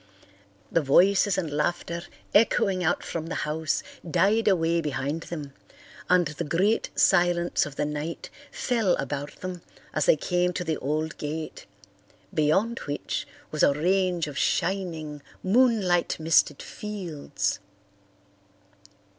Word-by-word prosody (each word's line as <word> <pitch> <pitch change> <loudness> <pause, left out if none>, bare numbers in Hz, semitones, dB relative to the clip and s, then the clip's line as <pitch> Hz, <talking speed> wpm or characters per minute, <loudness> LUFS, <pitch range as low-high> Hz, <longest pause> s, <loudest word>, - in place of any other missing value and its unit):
The 165 - +3
voices 190 +7 +4
and 165 -5 -2
laughter 170 +3 -1 0.3
echoing 195 -3 +3
out 170 - +1
from 165 -1 -4
the - - -4
house 155 0 -1 0.3
died 215 +8 +3
away 170 -3 +3
behind 145 +1 -2
them 150 -5 -6 0.6
and 180 -1 +5
the 150 +3 -4
great 185 +8 +1
silence 175 -3 +3
of 145 - -10
the 150 - 0
night 150 +2 -5 0.2
fell 225 -8 +1
about 140 +1 -5
them 185 -1 -5 0.3
as - - +1
they - - +7
came 180 0 0
to 180 - -2
the 160 -2 -1
old 155 +3 -2
gate, 155 +1 -5 0.7
beyond 190 +10 +2
which 145 0 -3 0.2
was 155 - -2
a 140 - +5
range 180 +1 +1
of 145 -2 -5
shining, 165 -6 -1 0.2
moonlight 200 -6 +3
misted 155 -2 +3
fields. 170 - -4
170 Hz, 125 wpm, -26 LUFS, 150-185 Hz, 0.7 s, they